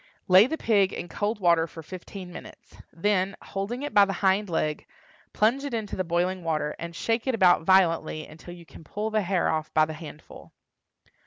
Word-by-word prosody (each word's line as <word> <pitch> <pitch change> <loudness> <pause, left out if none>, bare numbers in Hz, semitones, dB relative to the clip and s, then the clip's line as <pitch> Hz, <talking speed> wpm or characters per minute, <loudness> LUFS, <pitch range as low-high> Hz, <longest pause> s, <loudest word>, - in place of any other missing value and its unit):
Lay 190 +5 +7
the 320 +4 -3
pig 200 -7 +2
in - - -5
cold 210 +1 -2
water 170 -3 +3
for 165 0 -11
fifteen 185 +1 -9
minutes; - - -12 0.2
then, 190 +2 0
holding 210 +7 -5
it 290 - -5
by 205 - +7
the 195 0 0
hind 190 +1 +2
leg, 155 -2 -2 0.4
plunge 235 +6 +1
it 280 -4 -3
into 215 -3 -4
the 185 - -1
boiling 175 +2 -1
water, 155 -2 -2
and 170 0 -7
shake 225 +7 -1
it 260 - +1
about 180 -5 +4
violently 165 -4 +2
until 165 +3 -12
you 170 -1 -14
can 165 - -14
pull 210 +7 -4
the 215 0 +1
hair 185 -2 0
off 155 -1 -2
by 155 - +5
the 155 - -7
handful. 155 -1 -12
185 Hz, 195 wpm, -26 LUFS, 165-210 Hz, 0.4 s, Lay